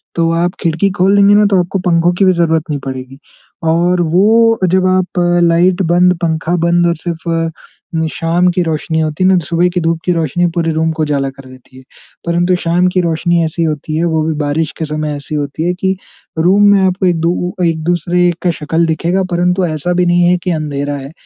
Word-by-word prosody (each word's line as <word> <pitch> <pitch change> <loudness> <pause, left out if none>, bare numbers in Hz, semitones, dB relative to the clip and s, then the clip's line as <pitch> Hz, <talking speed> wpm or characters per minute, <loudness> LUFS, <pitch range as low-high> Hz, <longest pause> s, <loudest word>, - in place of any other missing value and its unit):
तो 165 -1 +1
आप 175 - -2
खिड़की 165 +4 +1
खोल 195 +2 +3
देंगे 200 0 +5
ना 210 0 +4
तो 190 - +4
आपको 180 +2 -2
पंखों 175 -1 +2
की 195 - +4
भी 185 - +4
ज़रूरत 165 -2 +1
नहीं 145 -2 -2
पड़ेगी 130 0 -7 0.5
और 175 +2 +1
वो 220 +7 +3
जब 185 +1 +1
आप 185 0 0 0.2
लाइट 175 +3 +2
बंद, 175 +1 +3
पंखा 165 +1 -1
बंद 170 +1 +2
और 170 - 0
सिर्फ 165 0 -3 0.6
शाम 170 +2 0
की 180 - -1
रोशनी 160 0 -2
होती 155 +3 -2
है - - +4
ना 190 - +4
तो 170 - -3
सुबह 170 +3 +1
की 180 - 0
धूप 165 0 0
की 180 - +1
रोशनी 165 +1 0
पूरे 165 -1 0
रूम 160 +1 0
को 160 -1 -2
उजाला 140 -2 -1
कर 135 0 -14
देती 130 0 -17
है। 130 - -14 0.4
परंतु 175 +2 +1
शाम 175 +2 +2
की 185 - +2
रोशनी 170 0 0
ऐसी 165 +1 -2
होती 155 -1 -3
है। 165 - 0
वो 160 -2 0
भी 160 +1 -1
बारिश 150 +1 -1
के 160 - -3
समय 150 -1 -3
ऐसी 145 +2 -7
होती 145 +1 -3
है 175 +1 0
कि 190 +1 -1 0.4
रूम 190 +5 +3
में 200 -1 +4
आपको 185 +1 0
एक 175 -2 +1
दू 175 +1 -1
एक-दूसरे 175 +2 0
का 180 - +2
शक्ल 160 +1 -1
दिखेगा 170 +4 0
परंतु 180 +1 +1
ऐसा 160 +2 -2
भी 180 0 +1
नहीं 175 0 +2
है 180 - +3
कि 180 - -1
अंधेरा 145 -3 -3
है। 135 +1 -9
170 Hz, 215 wpm, -14 LUFS, 160-180 Hz, 0.6 s, देंगे